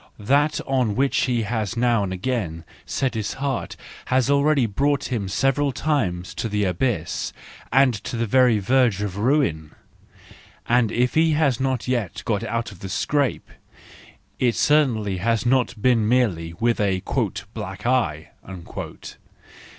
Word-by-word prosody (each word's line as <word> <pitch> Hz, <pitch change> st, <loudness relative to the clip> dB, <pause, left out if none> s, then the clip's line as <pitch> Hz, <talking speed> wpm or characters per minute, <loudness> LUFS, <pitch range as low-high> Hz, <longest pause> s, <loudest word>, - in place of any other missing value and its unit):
That 145 Hz, +8 st, +2 dB
on 125 Hz, -6 st, 0 dB
which 135 Hz, +1 st, +1 dB
he 120 Hz, -3 st, 0 dB
has 110 Hz, 0 st, -2 dB
now 120 Hz, -3 st, +2 dB
and 95 Hz, -, -3 dB
again 95 Hz, -5 st, -3 dB, 0.2 s
set 135 Hz, -2 st, -1 dB
his 110 Hz, -3 st, -3 dB
heart 135 Hz, -2 st, -3 dB, 0.3 s
has 130 Hz, +1 st, +2 dB
already 140 Hz, -2 st, +3 dB
brought 140 Hz, +5 st, 0 dB
him 110 Hz, -6 st, -1 dB
several 135 Hz, +7 st, +1 dB
times 105 Hz, -, -1 dB
to 115 Hz, -, -3 dB
the 105 Hz, 0 st, 0 dB
abyss, 90 Hz, -2 st, -1 dB, 0.4 s
and 135 Hz, 0 st, +4 dB
to -, -, -4 dB
the 115 Hz, -, 0 dB
very 125 Hz, 0 st, +4 dB
verge 115 Hz, -1 st, +2 dB
of 100 Hz, -2 st, -4 dB
ruin; 105 Hz, -, 0 dB, 0.9 s
and 120 Hz, -2 st, +3 dB
if 125 Hz, +1 st, +1 dB
he 160 Hz, 0 st, +3 dB
has 140 Hz, -5 st, +1 dB
as 130 Hz, -3 st, -1 dB
yet 100 Hz, -9 st, -2 dB
got 105 Hz, -1 st, 0 dB
out 115 Hz, -1 st, -3 dB
of 95 Hz, -, -14 dB
the 95 Hz, -, -7 dB
scrape, 140 Hz, +5 st, 0 dB, 0.9 s
it 120 Hz, -2 st, +2 dB
certainly 115 Hz, -10 st, +2 dB
has 115 Hz, +5 st, 0 dB
not 125 Hz, -2 st, +1 dB
been 115 Hz, -2 st, +2 dB
merely 95 Hz, -10 st, +1 dB
with 115 Hz, +6 st, 0 dB
a 95 Hz, -3 st, 0 dB, 0.5 s
"black 100 Hz, -3 st, -7 dB
eye." 100 Hz, -12 st, 0 dB
120 Hz, 145 wpm, -23 LUFS, 100-130 Hz, 0.9 s, and